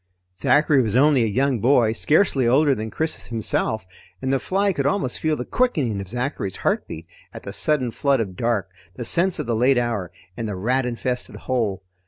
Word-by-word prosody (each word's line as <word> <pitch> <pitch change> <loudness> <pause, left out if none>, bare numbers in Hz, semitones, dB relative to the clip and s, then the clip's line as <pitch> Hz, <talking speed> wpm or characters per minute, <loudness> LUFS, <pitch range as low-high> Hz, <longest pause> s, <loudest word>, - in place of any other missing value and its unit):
Zachary 145 +8 +3
was 110 -2 -1
only 140 0 +4
a 115 - +2
young 130 +3 +1
boy, 120 -1 +3
scarcely 145 - +2
older 140 +4 +4
than 110 -2 -4
Chris 160 +7 -3
himself, 110 -2 -2 0.3
and 130 0 -1
the 135 - +2
fly 195 +6 0
could 140 -4 0
almost 145 -6 -1
feel 155 -1 0
the 125 - -5
quickening 145 - 0
of 95 - -8
Zachary's 120 -4 -3
heartbeat 80 +2 -1 0.3
at - - -8
the 100 - -7
sudden 130 +3 +1
flood 140 +2 +1
of 95 -5 -3
dark, 110 -4 -1 0.2
the 120 - -6
sense 175 +8 +2
of - - -3
the 115 -1 -1
late 125 +3 +3
hour, 115 -7 -1 0.2
and 115 - -4
the 100 - -3
rat 125 +7 0
infested 125 +1 -3
hold. 110 -7 -2
125 Hz, 195 wpm, -22 LUFS, 110-140 Hz, 0.3 s, only